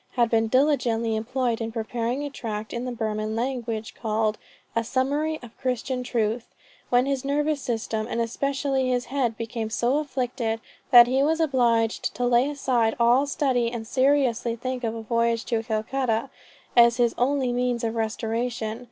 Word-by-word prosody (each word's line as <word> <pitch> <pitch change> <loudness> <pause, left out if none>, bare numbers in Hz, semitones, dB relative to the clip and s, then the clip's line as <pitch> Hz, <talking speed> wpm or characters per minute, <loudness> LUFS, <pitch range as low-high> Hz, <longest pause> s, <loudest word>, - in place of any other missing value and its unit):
had 235 -2 +2
been 225 -1 +3
diligently 235 -4 +2
employed 235 +1 -1
in 225 0 -3
preparing 235 +4 -2
a 290 - -3
Tract 215 -4 -5
in 235 +1 -3
the 250 - -3
Burman 215 -2 -2
language 235 -3 -3
called 220 -1 -1 0.4
'A 230 - +2
Summary 290 +6 0
of 240 -2 -12
Christian 255 0 -2
Truth;' 235 -1 -2 0.3
when 245 +1 +4
his 275 -2 -1
nervous 295 +1 0
system, 225 -2 -2
and 235 - -3
especially 270 +2 0
his 245 0 0
head 245 -5 0
became 230 -1 -4
so 240 +5 +1
afflicted, 250 -5 -2 0.3
that 240 -1 +10
he 260 +2 +1
was 320 +3 +2
obliged 240 -7 +1
to 245 - -1
lay 245 +3 +3
aside 250 -6 +1
all 245 +4 +4
study, 255 -5 +1
and 230 -2 -5
seriously 255 -2 +2
think 255 +1 -4
of 225 -1 -1
a 225 - -6
voyage 230 0 0
to 230 -2 0
Calcutta 225 +2 -1 0.4
as 235 0 +6
his 240 -2 +2
only 260 0 +1
means 245 -1 0
of 225 -1 -1
restoration. 225 0 -2
240 Hz, 165 wpm, -25 LUFS, 225-260 Hz, 0.4 s, that